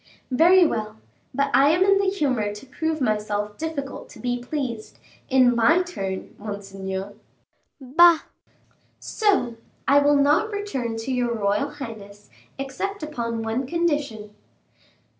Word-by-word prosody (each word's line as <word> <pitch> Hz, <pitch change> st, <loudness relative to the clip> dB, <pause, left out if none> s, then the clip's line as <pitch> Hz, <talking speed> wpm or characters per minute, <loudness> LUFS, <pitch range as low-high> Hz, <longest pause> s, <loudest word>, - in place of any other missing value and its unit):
"Very 345 Hz, +7 st, +6 dB
well; 215 Hz, -7 st, -2 dB, 0.3 s
but 280 Hz, +2 st, 0 dB
I 275 Hz, +2 st, +6 dB
am 340 Hz, +4 st, +4 dB
in 395 Hz, 0 st, +4 dB
the 395 Hz, -, +1 dB
humor 255 Hz, -, -1 dB
to 210 Hz, -, -11 dB
prove 315 Hz, +4 st, -3 dB
myself 210 Hz, -2 st, -1 dB
difficult 305 Hz, -4 st, -5 dB
to -, -, -14 dB
be 245 Hz, 0 st, -2 dB
pleased, 245 Hz, -4 st, -5 dB, 0.3 s
in 255 Hz, -2 st, +4 dB
my 300 Hz, +10 st, +4 dB
turn, 195 Hz, -, -5 dB
monseigneur." 195 Hz, -1 st, -6 dB, 0.7 s
"Bah!" 320 Hz, +5 st, +5 dB, 0.8 s
"So, 385 Hz, -, 0 dB, 0.3 s
I 280 Hz, +1 st, +6 dB
will 290 Hz, 0 st, +4 dB
not 295 Hz, +10 st, +3 dB
return 275 Hz, -, -3 dB
to 225 Hz, +4 st, -4 dB
your 245 Hz, -2 st, 0 dB
royal 210 Hz, +5 st, 0 dB
highness, 220 Hz, -8 st, -10 dB, 0.3 s
except 290 Hz, +8 st, -4 dB
upon 235 Hz, -7 st, -3 dB
one 230 Hz, +4 st, -2 dB
condition." 290 Hz, -10 st, -1 dB
260 Hz, 130 wpm, -24 LUFS, 220-315 Hz, 0.8 s, Very